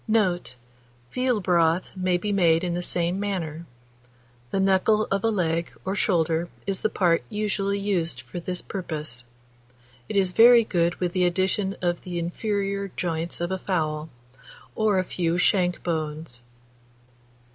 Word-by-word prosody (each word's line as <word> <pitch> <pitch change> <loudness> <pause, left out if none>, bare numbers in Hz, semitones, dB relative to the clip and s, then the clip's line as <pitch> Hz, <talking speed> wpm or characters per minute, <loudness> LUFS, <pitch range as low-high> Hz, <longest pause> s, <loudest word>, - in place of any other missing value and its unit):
Note. 185 - +1 0.6
Veal 255 -3 +1
broth 170 -1 +2
may 185 -1 +1
be 205 +4 -3
made 170 -4 +3
in 175 -1 -1
the 175 - -1
same 175 +1 -1
manner; 170 -5 -3 0.8
the 195 - -1
knuckle 195 +3 +3
of 195 0 +1
a 225 - +3
leg 170 -5 0
or 190 +1 -1
shoulder 165 -3 +1 0.2
is 195 -1 -1
the 215 - 0
part 170 -5 +2
usually 200 -1 -1
used 170 -10 -1
for 120 +8 -7
this 180 +1 -3
purpose. 155 - -5 0.9
It - - -4
is 190 -2 +3
very 235 +4 +7
good 170 -4 +1
with 175 -1 -2
the 185 -1 +2
addition 190 +2 0
of 175 -1 0
the 180 -2 -5
inferior 200 +3 -2
joints 165 -1 0
of 175 +1 -2
a 190 - -1
fowl, 155 -4 -2 0.6
or 215 -3 +2
a 185 - +2
few 170 -1 -1
shank 180 -1 +2
bones. 155 -6 -3
180 Hz, 150 wpm, -25 LUFS, 170-200 Hz, 0.9 s, very